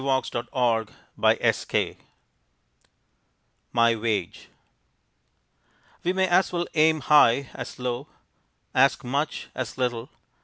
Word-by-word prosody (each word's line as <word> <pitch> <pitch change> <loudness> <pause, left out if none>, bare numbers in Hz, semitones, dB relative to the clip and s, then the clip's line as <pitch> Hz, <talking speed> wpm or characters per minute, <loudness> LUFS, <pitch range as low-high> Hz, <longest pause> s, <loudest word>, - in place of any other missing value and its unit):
Joseph 130 -3 -1
Morris, 115 -4 0 2.1
MY 115 -1 +3
WAGE 110 -5 -3 1.5
We 175 - +1
may 190 0 +1
as 185 +1 +3
well 175 -1 -1
aim 155 0 +3
high 140 -2 +4
as 125 - -8
low, 125 +2 -4 0.7
ask 135 +3 +3
much 140 +5 -3
as 130 -1 -5
little. 125 -2 -2
130 Hz, 90 wpm, -25 LUFS, 120-150 Hz, 2.1 s, high